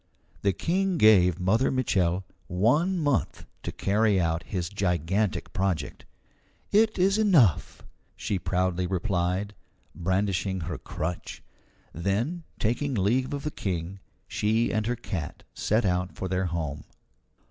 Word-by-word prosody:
The 100 Hz, -, +3 dB
King 185 Hz, -, 0 dB
gave 95 Hz, -, +5 dB
Mother 105 Hz, +8 st, +2 dB
Mitchel 95 Hz, -8 st, +1 dB, 0.2 s
one 130 Hz, -, +2 dB
month 145 Hz, -, 0 dB, 0.2 s
to -, -, -4 dB
carry 105 Hz, 0 st, +2 dB
out 85 Hz, -1 st, 0 dB
his 90 Hz, -2 st, -3 dB
gigantic 95 Hz, 0 st, -1 dB
project. 95 Hz, -6 st, -2 dB, 0.7 s
"It 215 Hz, +1 st, +4 dB
is 195 Hz, +3 st, +3 dB
enough," 155 Hz, -, +3 dB, 0.3 s
she 100 Hz, -, -2 dB
proudly 90 Hz, 0 st, 0 dB
replied, 95 Hz, +1 st, -1 dB, 0.4 s
brandishing 95 Hz, +1 st, -1 dB
her 85 Hz, 0 st, -4 dB
crutch. 85 Hz, +2 st, -5 dB, 0.5 s
Then, 105 Hz, -, -1 dB, 0.2 s
taking 125 Hz, +5 st, 0 dB
leave 115 Hz, +6 st, +1 dB
of 140 Hz, -1 st, -4 dB
the 150 Hz, -, -2 dB
King, 90 Hz, -, -4 dB, 0.3 s
she 110 Hz, +3 st, +1 dB
and 110 Hz, 0 st, 0 dB
her 120 Hz, -, 0 dB
cat 85 Hz, -8 st, -5 dB
set 110 Hz, +2 st, +1 dB
out 90 Hz, 0 st, 0 dB
for 95 Hz, -, -4 dB
their 95 Hz, 0 st, 0 dB
home. 80 Hz, -4 st, -3 dB
95 Hz, 125 wpm, -27 LUFS, 90-120 Hz, 0.7 s, gave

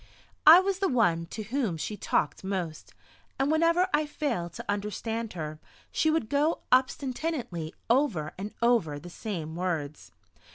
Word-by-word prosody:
I 325 Hz, +3 st, +12 dB
was 390 Hz, 0 st, -1 dB
the 390 Hz, -, +2 dB
one 175 Hz, -10 st, +2 dB
to 215 Hz, -, -6 dB
whom 225 Hz, -6 st, -1 dB
she 210 Hz, +7 st, -4 dB
talked 150 Hz, -, -1 dB
most, 185 Hz, -5 st, -4 dB, 0.4 s
and 275 Hz, +2 st, +1 dB
whenever 335 Hz, +3 st, +3 dB
I 300 Hz, 0 st, +2 dB
failed 180 Hz, -, -2 dB
to -, -, -8 dB
understand 210 Hz, +2 st, -3 dB
her 155 Hz, -3 st, -5 dB, 0.3 s
she 315 Hz, -, +2 dB
would 310 Hz, -8 st, +1 dB
go 290 Hz, +6 st, +1 dB
obstinately 255 Hz, -, 0 dB
over 230 Hz, -, +1 dB
and 200 Hz, +3 st, -6 dB
over 225 Hz, -12 st, +3 dB
the 175 Hz, +4 st, -10 dB
same 165 Hz, -6 st, -5 dB
words. 165 Hz, -5 st, -3 dB
215 Hz, 150 wpm, -28 LUFS, -, 0.4 s, I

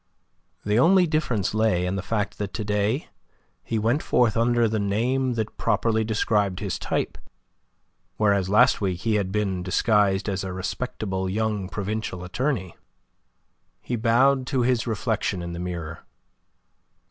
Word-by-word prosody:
The 105 Hz, +2 st, +2 dB
only 180 Hz, +6 st, +5 dB
difference 150 Hz, -, 0 dB
lay 110 Hz, -5 st, +2 dB
in 90 Hz, +1 st, -1 dB
the 95 Hz, -, -2 dB
fact 105 Hz, +1 st, -2 dB
that 100 Hz, -1 st, -4 dB
to 110 Hz, -, -3 dB
day 105 Hz, +7 st, -1 dB, 0.5 s
he 115 Hz, -, -2 dB
went 115 Hz, +7 st, +1 dB
forth 120 Hz, -4 st, +2 dB
under 120 Hz, 0 st, +3 dB
the 110 Hz, 0 st, -1 dB
name 120 Hz, +6 st, 0 dB
that 110 Hz, -2 st, -3 dB
properly 110 Hz, 0 st, +1 dB
described 105 Hz, -3 st, 0 dB
his 100 Hz, -3 st, -3 dB
type, -, -, -2 dB, 1.0 s
whereas 100 Hz, -3 st, +2 dB
last 105 Hz, +1 st, +4 dB
week 90 Hz, -3 st, -1 dB
he 110 Hz, +1 st, 0 dB
had 100 Hz, -3 st, 0 dB
been 100 Hz, -3 st, -1 dB
disguised 100 Hz, +1 st, +2 dB
as 100 Hz, -2 st, -2 dB
a 95 Hz, -, -4 dB
respectable 95 Hz, -1 st, -3 dB
young 105 Hz, -1 st, -1 dB
provincial 100 Hz, -3 st, -4 dB
attorney. 100 Hz, -, -2 dB, 1.0 s
He 120 Hz, -, -3 dB
bowed 130 Hz, +4 st, +3 dB
to 130 Hz, -3 st, +1 dB
his 125 Hz, -1 st, +1 dB
reflection 110 Hz, -4 st, -1 dB
in 85 Hz, 0 st, -5 dB
the 85 Hz, -, -6 dB
mirror. 85 Hz, -2 st, -5 dB
105 Hz, 145 wpm, -24 LUFS, 95-115 Hz, 1.0 s, only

